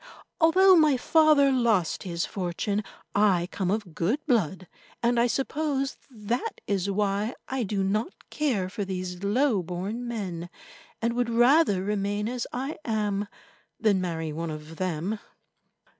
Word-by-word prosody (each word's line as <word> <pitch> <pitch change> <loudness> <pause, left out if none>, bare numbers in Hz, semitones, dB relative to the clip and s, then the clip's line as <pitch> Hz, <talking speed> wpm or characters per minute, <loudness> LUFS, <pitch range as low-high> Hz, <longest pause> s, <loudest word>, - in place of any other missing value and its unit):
Although 370 +3 +6
my 305 -4 +5
father 300 0 +5
lost 230 -9 +2
his 170 -2 -2
fortune, 200 +3 -2 0.3
I 195 -4 +3
come 190 -3 -2
of 205 -4 -2
good 180 - +1
blood, 190 - 0 0.4
and 235 0 +3
I 235 - +4
suppose 275 +1 -1
that 240 - -3
is 200 -1 -1
why 205 +3 0
I 265 0 -2
do 200 -3 -1
not 210 - -3
care 245 -12 0
for 200 +2 -4
these 185 -1 -5
low 220 +1 +2
born 190 +8 -4
men, 185 -7 -4 0.5
and 230 0 +1
would 245 0 0
rather 240 - +4
remain 205 +1 -1
as 245 0 -3
I 270 +5 -4
am 210 -3 -1 0.5
than 205 -4 +3
marry 165 -3 -3
one 165 +2 -3
of 155 +1 -8
them." 185 +3 -2
210 Hz, 145 wpm, -27 LUFS, 185-245 Hz, 0.5 s, Although